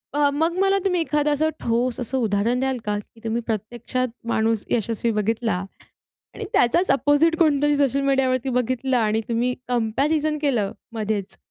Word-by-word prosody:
अ, 290 -1 +4
मग 325 +4 0
मला 390 0 +3
तुम्ही 360 -2 +2
एखादं 300 -2 +1
असं 315 +2 +1
ठोस 240 +2 0
असं 250 +2 -2
उदाहरण 220 +4 +1
द्याल 265 -1 0
का? 205 0 0
की 225 +2 -16
तुम्ही 230 +1 -1
प्रत्यक्षात 235 +4 -2 0.2
माणूस 220 -1 +1
यशस्वी 230 +1 0
बघितला 225 +2 0 0.8
आणि - - -5
त्याचाच 340 +10 +3
अपोझिट 290 +4 +3
कोणतरी 295 -2 +3
सोशल 275 -1 +2
मीडियावरती 265 -2 +1
बघितला 255 +1 0
आणि 215 +1 +1
तुम्ही 240 +2 +1
कम्पॅरिझन 285 +7 0
केलं 240 -9 +1 0.2
मध्येच 210 -3 -3
250 Hz, 150 wpm, -23 LUFS, 225-290 Hz, 0.8 s, अ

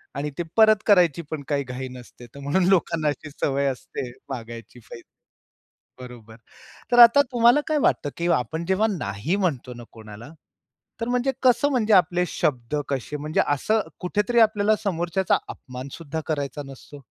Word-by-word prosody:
आणि 145 +2 -3
ते 175 - -1
परत 220 -1 +7
करायची 175 -6 +4
पण 150 -3 -4
काही 140 -1 -1
घाई 130 0 -6
नसते. 125 -1 -13
तर 130 +4 -14
म्हणून 145 +7 0
लोकांना 165 -4 +1
अशी 150 +1 -3
सवय 140 -1 -1
असते 130 -1 -5 0.2
मागायची 115 -2 -8
पाहिजे 115 0 -13 0.9
बरोबर. 115 -3 -12 0.6
तर 240 - +4
आता 240 +4 +9
तुम्हाला 240 +3 +5
काय 310 -1 +1
वाटतं 145 - +1
की 170 - -2
आपण 160 +8 -4
जेव्हा 190 +4 +2
नाही 105 - -2
म्हणतो 140 -10 -2
ना 120 - -10
कोणाला 110 +4 -12 0.7
तर 230 - -3
म्हणजे 250 +2 0
कसं 260 +2 +4
म्हणजे 225 -5 +2
आपले 180 -1 +3
शब्द 125 -3 -2
कसे 135 +1 -3
म्हणजे 150 +2 -1
असं 215 +10 +1 0.2
कुठेतरी 210 +6 0
आपल्याला 215 -1 +3
समोरच्याचा 175 0 0
अपमान 125 +1 -9
सुद्धा 160 -1 -6
करायचा 145 -1 -3
नसतो. 135 +1 -13
155 Hz, 155 wpm, -23 LUFS, 130-205 Hz, 0.9 s, आता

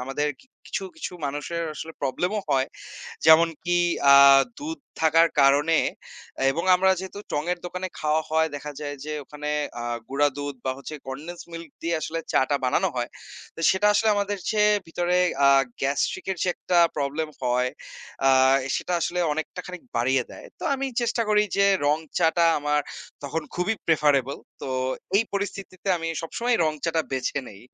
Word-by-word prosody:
আমাদের 140 +3 -1 0.4
কিছু, - - -3
কিছু 305 - -5
মানুষের 145 +4 -3
আসলে 160 +1 -7
প্রবলেম 145 +7 0
ও - - -1
হয়। 135 -1 +2 0.6
যেমনকি 165 +2 +5 0.4
আ - - +9 0.4
দুধ 315 +3 -5 0.2
থাকার 165 +1 +5
কারণে 145 +4 +4 0.7
এবং 165 +5 -2
আমরা 190 +1 +3
যেহেতু 190 +2 -7
টং 145 - 0
এর 180 - -4
দোকানে 180 +1 -4
খাওয়া 155 +1 +1
হয় 160 0 +2
দেখা 150 +1 -7
যায় 145 -1 -5
যে 155 - -4
ওখানে 150 +1 -6 0.3
আ - - -4 0.2
গুঁড়া 145 +2 +2
দুধ 145 0 -4
বা 130 - 0
হচ্ছে 155 +3 -8
কনডেন্সড 160 +6 -7
মিল্ক 165 -1 -7
দিয়ে 170 0 0
আসলে 165 +1 -3
চা-টা 140 +2 +2
বানানো 170 +9 +2
হয়। 120 -1 -1 0.5
তো - - -7
সেটা 190 +2 +2
আসলে 220 +1 +3
আমাদের 205 0 -1
চেয়ে 210 -1 +4
ভিতরে 175 +2 0 0.3
আ - - +7 0.3
গ্যাস্ট্রিক 140 +7 -1
এর 190 - -2
যে 185 - +1
একটা 180 - 0 0.2
প্রবলেম 145 +2 -2
হয় 125 0 +1 0.6
আ - - +7 0.5
সেটা - - -4
আসলে 180 +2 -1
অনেকটা 160 +4 -4
খানিক 180 0 -8
বাড়িয়ে 125 +2 +2
দেয়। - - -11
তো - - -7
আমি 270 0 -2
চেষ্টা 235 0 0
করি 210 0 +4
যে 200 - +4 0.2
রং 150 +2 +3 0.2
চা-টা 165 +1 +3
আমার 150 0 +1 0.4
তখন 160 +3 -2
খুবই 180 +5 0
প্রেফারেবল। 145 -4 +2 0.3
তো 135 - -4 0.5
এই 215 - +4
পরিস্থিতিতে 195 -1 -5
আমি 165 0 -4
সবসময় 235 +8 0
রং 155 - +1
চা-টা 165 -1 +1
বেছে 130 +1 -1
নেই। 100 -1 -13
160 Hz, 165 wpm, -25 LUFS, 145-180 Hz, 0.7 s, আ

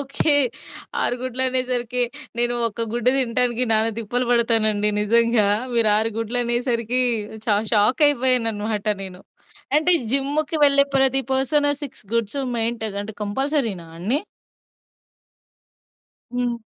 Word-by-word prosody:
Okay. 280 +2 +1 0.7
6 245 - 0
గుడ్లనేసరికి, 255 -1 0 0.4
నేను 240 0 +1
ఒక 230 +2 -1
గుడ్డు 240 +1 +2
తినటానికి 245 -1 +1
నానా 220 +1 +3
తిప్పలు 245 +3 -2
పడతానండి 225 -3 +2
నిజంగా. 230 0 +2 0.3
మీరు 230 -2 +3
6 220 +1 0
గుడ్లనేసరికి 240 +1 -1 0.4
చ - - -21 0.3
షాక్ 220 +7 +3
అయిపోయానన్నమాట 225 -6 +1 0.2
నేను. 185 -1 -9 0.5
అయితే 315 +4 +3 0.2
జిమ్ముకి 285 +4 0
వెళ్ళే 280 -1 +5
ప్రతి 270 0 +3
పర్సన్ 290 +2 +2
6 275 -5 -9
గుడ్స్ 230 +3 -1 0.2
మెయింటైన్ 225 -2 -2
అంటే 215 +2 -8
కంపల్సరీనా 225 - -1
అన్నీ? 225 - 0 2.1
హ్మ్. 245 -1 -2
240 Hz, 110 wpm, -22 LUFS, 225-260 Hz, 2.1 s, వెళ్ళే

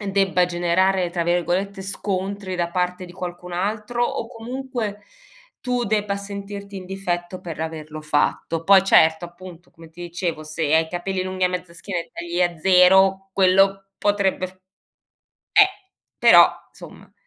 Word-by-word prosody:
uhm, 200 -2 -4
debba 190 -2 +2
generare, 175 +1 +1
tra 170 -1 -1
virgolette, 180 +3 -1
"scontri" 195 0 -4
da 170 -1 -1
parte 180 0 -1
di 175 - -12
qualcun 180 0 -7
altro, 210 +6 -2
o 230 - -3
comunque, 235 -2 -5 0.6
tu 250 -1 -1
debba 205 -1 0
sentirti 200 0 -8
in 185 -1 -8
difetto 180 -2 -4
per 165 -2 -7
averlo 155 -1 -6
fatto; 155 +2 -1
poi 195 +1 +7
certo, 160 -3 +4
appunto 175 0 -13
come 165 -2 -16
ti 170 - -14
dicevo, 170 -2 -4
se 155 0 -1
hai 160 0 +4
i - - -14
capelli 185 +2 -3
lunghi 185 0 -2
a - - +3
mezza 180 -1 -5
schiena 180 -1 -4
e - - -11
tagli 175 +1 -4
a 175 -1 0
zero 190 +2 +5
quello 195 +1 +3
potrebbe 200 -2 0
f - - -17 1.0
eh,r 395 - +7 0.5
però, - - +8 0.2
insomma - - -14
185 Hz, 155 wpm, -22 LUFS, 175-195 Hz, 1.0 s, però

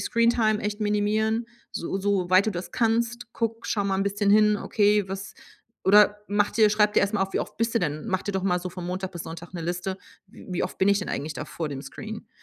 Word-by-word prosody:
Screentime 230 -2 +2
echt 210 +1 -3
minimieren, 215 +2 +1 0.3
so 190 +3 -3
so 195 -2 0
weit 185 +3 +5
du - - +2
das 175 0 -5
kannst. 235 +1 0
Guck 230 0 -3
schau 205 - 0
mal 195 -1 0
bisschen 200 0 +1
hin: 210 0 +5
„Okay, 205 -1 +2
was“ 195 +1 -6 0.5
oder 205 +1 +6
mach 205 0 +2
dir 215 -2 +4
schreib 210 0 +3
dir - - +4
erst 200 +2 0
mal 200 - +2
auf, 195 - -3
wie - - 0
oft - - -6
bist 230 +1 -1
du 230 - +4
denn 150 -2 -2
mach 185 -1 -1
dir 205 - -3
doch 190 -1 -1
mal 180 -2 +2
so 180 - -4
von 180 0 -7
Montag 185 +1 -3
bis 175 -3 -7
Sonntag 165 +2 -9
'ne 175 - -5
Liste: 180 +3 -3 0.3
„W 200 - -14
wie 180 - -1
oft - - -4
bin 190 - +3
ich 200 0 +3
denn 190 - -5
eigentlich 150 +2 -3
da - - -5
vor 160 -2 -5
dem 140 -2 -6
Screen?“ 215 - -8
205 Hz, 245 wpm, -26 LUFS, 185-215 Hz, 0.5 s, oder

